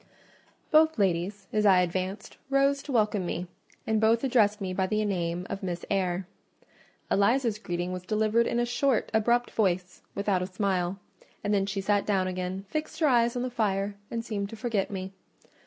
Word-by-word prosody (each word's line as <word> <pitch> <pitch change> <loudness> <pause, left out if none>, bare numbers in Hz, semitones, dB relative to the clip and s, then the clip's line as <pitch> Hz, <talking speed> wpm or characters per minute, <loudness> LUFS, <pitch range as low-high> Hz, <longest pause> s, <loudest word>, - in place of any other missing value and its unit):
Both 315 -1 +5
ladies, 195 +1 0
as 215 - +2
I 190 -3 +6
advanced, 185 +3 -3
rose 275 0 +3
to 285 - -7
welcome 210 -5 +2
me, 175 0 -3 0.4
and 220 -1 +1
both 225 +2 +3
addressed 225 -5 +3
me 190 -2 -3
by 190 0 0
the 215 +1 0
name 175 -3 -2
of 195 - -5
"Miss 175 -3 -4
Eyre." 185 -1 0 0.9
Eliza's 225 +2 +2
greeting 175 -3 -3
was 185 0 -4
delivered 215 +4 +1
in 235 - 0
a 240 - +2
short, 245 0 +1
abrupt 235 +2 +2
voice, 180 -4 0
without 200 -2 +1
a 180 - -2
smile; 185 -1 -1 0.5
and 205 0 0
then 195 -1 +2
she 195 0 -2
sat 205 +1 +1
down 195 -3 +2
again, 185 +1 -3
fixed 310 +6 -4
her 320 - +3
eyes 235 -2 +3
on 245 - -1
the 255 - -3
fire, 205 -3 0 0.2
and 230 -1 -4
seemed 200 -3 -3
to 225 - -8
forget 220 -4 -1
me. 190 -1 -5
205 Hz, 185 wpm, -28 LUFS, 185-230 Hz, 0.9 s, I